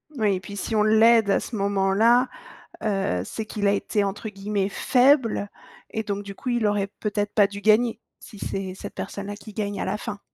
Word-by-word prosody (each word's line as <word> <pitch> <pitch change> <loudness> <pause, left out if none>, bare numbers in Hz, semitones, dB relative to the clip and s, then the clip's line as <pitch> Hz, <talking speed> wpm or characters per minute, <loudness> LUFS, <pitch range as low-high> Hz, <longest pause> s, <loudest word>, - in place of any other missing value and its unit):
Oui 210 -5 +2
et - - -3
puis 200 +2 -9
si 215 +3 -4
on 210 - +4
l'aide 220 0 +5
à - - +3
ce 235 - -6
moment-là, 200 +5 +3 0.5
heu, 195 - 0
c'est 220 - -5
qu'il 205 -1 -2
a - - +4
été 205 +1 0
entre 205 +2 -3
guillemets 200 0 -2
«faible» 250 -4 +3 0.4
et 220 - -2
donc, 205 0 -3
du 200 -1 -8
coup, 255 - -5
il 240 -3 +1
aurait 205 -1 0
peut-être 205 -1 -2
pas 205 -2 +5
dû 200 0 -8
gagner, 220 +2 +3 0.2
si 210 - -13
c'est 190 -1 -4
cette - - -8
personne-là 200 +1 -5
qui 210 0 -12
gagne 205 -1 -3
à - - -2
la - - -1
fin? 205 -1 -6
205 Hz, 210 wpm, -24 LUFS, 200-220 Hz, 0.5 s, l'aide